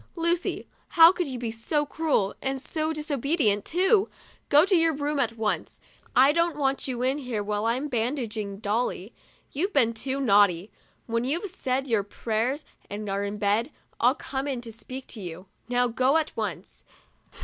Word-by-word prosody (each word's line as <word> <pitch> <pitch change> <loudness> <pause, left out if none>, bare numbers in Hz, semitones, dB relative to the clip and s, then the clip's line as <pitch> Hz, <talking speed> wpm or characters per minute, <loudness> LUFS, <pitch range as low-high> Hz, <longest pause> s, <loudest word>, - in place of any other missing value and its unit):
Lucy, 335 0 -1 0.2
how 330 0 +8
could 355 -3 -2
you 260 -2 -5
be 235 -2 -3
so 295 +7 -1
cruel, 290 -10 0
and 270 0 -2
so 310 +3 -2
disobedient, 285 - 0
too! 385 +4 +2 0.4
Go 295 +4 +6
to 390 - +2
your 330 -2 +3
room 290 0 -1
at 230 -3 0
once; 220 -2 -2 0.4
I 265 +3 +7
don't 335 0 +1
want 275 -2 0
you 250 -2 -2
in 265 +3 +1
here 245 -6 -3
while 210 +1 -1
I'm 255 +6 0
bandaging 225 -5 -3
Dolly, 215 -1 -2 0.4
you've 370 +9 -1
been 235 -5 +3
too 265 +4 -2
naughty. 200 -6 +3 0.3
When 230 0 -1
you've 335 +9 -1
said 265 -6 -1
your 225 -6 +1
prayers 230 +7 -2 0.2
and 210 +1 -5
are 200 +1 -1
in 205 +1 -3
bed, 210 +5 +1 0.3
I'll 250 +3 +4
come 275 -2 -4
in 265 -3 -2
to 235 -1 -9
speak 255 +4 -8
to 220 - -7
you. 175 0 -7 0.2
Now, 245 0 +2
go 255 +5 +2
at 315 -1 -2
once." - - -5
255 Hz, 175 wpm, -26 LUFS, 220-295 Hz, 0.4 s, how